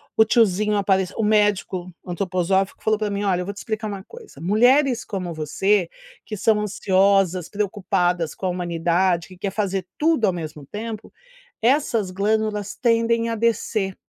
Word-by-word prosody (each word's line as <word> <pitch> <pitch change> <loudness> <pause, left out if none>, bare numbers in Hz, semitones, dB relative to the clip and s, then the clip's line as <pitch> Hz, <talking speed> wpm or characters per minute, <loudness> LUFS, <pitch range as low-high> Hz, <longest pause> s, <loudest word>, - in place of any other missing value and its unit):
o 220 - +6
tiozinho 215 -2 +2
apareceu 190 -2 0
o 225 - 0
médico 205 -4 +1 0.2
antroposófico 185 +1 -1
falou 215 0 +1
para 210 -1 -1
mim: 200 0 -2
"Olha 185 -3 +1
eu - - -4
vou 200 - -4
te - - -20
explicar 215 -1 -4
uma 200 -2 -6
coisa, 460 - -13
mulheres 245 - +3
como 180 -4 -4
você, 175 +4 +1 0.4
que 215 - -5
são 210 +1 +2
ansiosas, 195 -3 +2
preocupadas 185 -5 -1
com 190 - -6
a - - +1
humanidade. 175 0 0
que 185 - -13
quer 195 +1 -3
fazer 195 -3 -2
tudo 310 -7 +2
ao 185 - +1
mesmo 155 -4 -7
tempo, 220 +4 -7 0.5
essas 230 -5 +1
glândulas 210 +1 -1
tendem 230 -1 +1
a 230 - -1
descer." 215 -3 0
200 Hz, 160 wpm, -22 LUFS, 185-220 Hz, 0.5 s, o